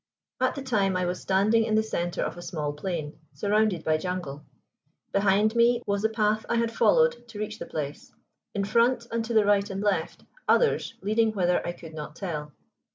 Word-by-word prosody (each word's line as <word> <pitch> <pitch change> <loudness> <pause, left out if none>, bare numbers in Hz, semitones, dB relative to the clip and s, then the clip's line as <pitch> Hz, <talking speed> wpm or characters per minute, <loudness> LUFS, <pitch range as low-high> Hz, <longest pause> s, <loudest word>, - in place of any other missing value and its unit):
At 255 0 +1
the 275 - -5
time 200 -7 +1
I 180 - 0
was 180 +1 -3
standing 205 +4 +3
in 220 -1 0
the 220 - +3
center 175 -5 -2
of - - -3
a 175 - -9
small 150 -4 -3
plain, 155 -1 -4
surrounded 210 -4 +1
by 155 0 +2
jungle. 155 -4 -4 0.7
Behind 205 +3 +3
me 235 +1 +4
was 200 0 0
the 220 - +2
path 215 -1 +1
I - - +1
had 230 0 +1
followed 485 - +3
to 225 -2 -10
reach 215 +1 -4
the - - -6
place; 145 -2 -5 0.4
in 200 - 0
front, 235 +3 +2
and 230 0 -1
to 230 0 -3
the 215 -2 +5
right 205 0 +3
and 195 0 -4
left, 205 -1 -1 0.2
others 485 - +2
leading 220 +2 +2
whither 180 -3 +1
I 175 - -3
could 165 -2 -12
not 150 0 -7
tell. 155 -5 -5
205 Hz, 200 wpm, -27 LUFS, 175-225 Hz, 0.7 s, the